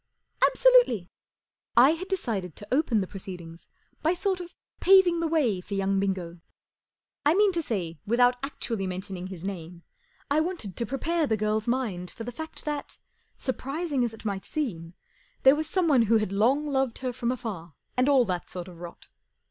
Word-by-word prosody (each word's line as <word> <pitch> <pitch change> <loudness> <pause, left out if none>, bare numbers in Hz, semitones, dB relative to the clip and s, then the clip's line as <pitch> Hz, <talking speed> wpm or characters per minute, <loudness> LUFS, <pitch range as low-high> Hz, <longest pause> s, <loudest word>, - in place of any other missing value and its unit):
" - - +2
Absolutely! 485 - +4 0.3
" - - -43
I - - +5
had 340 +4 -4
decided 220 - -2
to 205 - -10
open 255 -6 +2
the - - -1
proceedings 175 -4 -9 0.3
by 330 +3 +2
sort 380 0 -1
of 355 0 -9 0.2
paving 370 -3 +6
the 335 - 0
way 265 - +1
for 200 +2 -6
young 195 0 +1
Bingo. 185 -3 -2 0.8
I 295 +3 +4
mean 410 0 +5
to 340 -2 -1
say, 175 - -3
without 245 +3 +3
actually 230 -8 -3
mentioning 185 0 -5
his 185 -2 -8
name, 175 -3 -6 0.5
I 295 - +4
wanted 315 - -2
to 235 - -2
prepare 320 +4 0
the 220 - +1
girl's 215 +1 0
mind 220 -8 -1
for 230 - -8
the 245 - -5
fact 315 +7 -7
that, 295 -1 -4 0.4
surprising 275 +2 -2
as 235 - 0
it 225 0 -13
might 195 -3 -2
seem, 180 - -4 0.5
there 265 +2 +8
was 310 0 -2
some¬ 365 +1 +1
one 275 -6 +5
who 225 0 +4
had 215 -3 -1
long 245 +9 +2
loved 270 -4 0
her 250 - -1
from 240 0 -1
afar 205 - -6 0.2
and 255 +2 +3
all 265 -4 +5
that 180 -3 -3
sort 180 -1 -5
of 175 -2 -12
rot. 175 -1 -10
235 Hz, 190 wpm, -27 LUFS, 190-300 Hz, 0.8 s, there